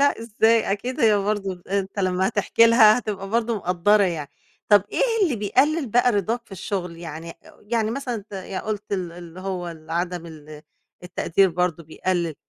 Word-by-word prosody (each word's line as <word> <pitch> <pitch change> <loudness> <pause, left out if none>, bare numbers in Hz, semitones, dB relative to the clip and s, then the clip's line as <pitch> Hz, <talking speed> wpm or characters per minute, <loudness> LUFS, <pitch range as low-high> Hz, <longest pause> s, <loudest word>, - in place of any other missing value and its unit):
لأ، 285 -3 +3
إزاي! 225 -1 +2
أكيد 245 +6 -4
هي 220 -2 +5
برضو 200 -1 -1
أنت 195 +1 -2
لمّا 185 0 +1
هتحكي 220 +3 +3
لها 230 -1 +6
هتبقى 200 -5 -5
برضو 230 0 0
مقدّرة 185 +3 +2
يعني. 160 -7 -2 0.4
طَب 205 -2 +6
إيه - - +1 0.2
اللي 305 - +2
بيقلل 270 +8 +1
بقى 245 +2 +3
رضاك 225 +4 -1
في - - -16
الشغل؟ 180 -2 -4
يعني 165 0 -8 0.3
يعني 220 0 -1
مثلًا 255 0 -3
أنت 210 -2 -8 0.3
قُلت 210 -1 -4
ال 180 -3 -2
اللي 175 0 -11
هو 185 -2 -4
ال 160 -1 -11
عدم 175 0 -2
ال 155 -2 -11 0.4
التقدير 180 +1 +1
برضو 175 -1 -1
بيقلل، 170 +1 -2
195 Hz, 170 wpm, -23 LUFS, 175-220 Hz, 0.4 s, لها